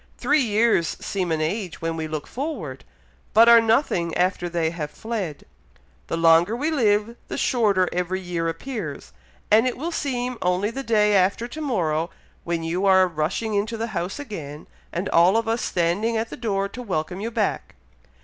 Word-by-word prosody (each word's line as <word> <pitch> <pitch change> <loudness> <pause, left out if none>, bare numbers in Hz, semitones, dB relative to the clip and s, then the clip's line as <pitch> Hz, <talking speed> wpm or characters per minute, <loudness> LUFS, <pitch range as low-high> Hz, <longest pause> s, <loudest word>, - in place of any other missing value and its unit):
Three 305 - +2
years 220 -6 +2
seem 185 -4 -2
an 160 -1 0
age 180 +3 -3
when 165 0 -2
we 160 -1 -3
look 155 -2 -4
forward, 235 - -5 0.5
but 225 +2 +8
are 235 -1 +9
nothing 220 - +1
after 180 -1 0
they 165 -2 0
have 155 -3 -4
fled. 195 -4 -5 0.6
The 165 - -2
longer 165 +5 +5
we 295 +6 -1
live, 220 -5 +2
the - - -5
shorter 205 -7 +2
every 180 +1 -1
year 175 -2 -2
appears, 165 - -6 0.4
and 225 +4 +6
it 250 - -2
will 325 +6 -3
seem 250 -5 -2
only 180 +4 +1
the 270 - -4
day 210 -4 +3
after 200 +4 +2
to 315 - -7
morrow 170 - 0 0.3
when 170 -1 -2
you 175 +4 0
are 190 -1 +6
rushing 175 +7 -2
into 215 +3 -1
the 225 +1 -2
house 180 +1 -3
again, 160 - -7 0.3
and 180 +3 -3
all 175 +5 +5
of 225 0 -1
us 225 +1 0
standing 190 +7 0
at 225 +1 -3
the - - -5
door 200 -4 -1
to 250 +5 -8
welcome 180 -4 -3
you 225 - -2
back. 235 - -2
195 Hz, 180 wpm, -23 LUFS, 170-230 Hz, 0.6 s, are